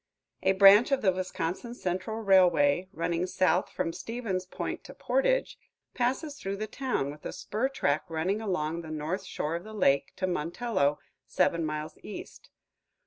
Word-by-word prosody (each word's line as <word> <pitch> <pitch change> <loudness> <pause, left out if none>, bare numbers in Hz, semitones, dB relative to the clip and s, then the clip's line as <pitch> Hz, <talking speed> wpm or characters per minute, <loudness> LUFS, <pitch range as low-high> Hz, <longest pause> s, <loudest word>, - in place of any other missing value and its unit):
A - - +3
branch 200 +6 +7
of 270 -3 +1
the 190 - +5
Wisconsin 185 +5 -3
Central 215 +3 -3
Railway, 180 -4 +4
running 170 -1 -1
south 185 -2 +2
from 165 - -2
Stevens 210 -6 -4
Point - - -5
to - - -11
Portage, - - +1 0.3
passes 265 +4 -1
through 195 +1 -3
the 215 - -2
town, 230 - -2
with 150 +1 -13
a - - -4
spur 230 +6 -2
track 150 - 0
running 180 +6 -1
along 170 -5 -1
the 160 - -9
north 155 +5 -3
shore 160 -3 -3
of 170 - -9
the 215 +1 -10
lake 140 -8 +2
to 185 - -1
Montello, 175 -2 0 0.3
seven 170 -1 +1
miles 155 0 -4
east. 210 - -9
185 Hz, 160 wpm, -29 LUFS, 165-220 Hz, 0.3 s, branch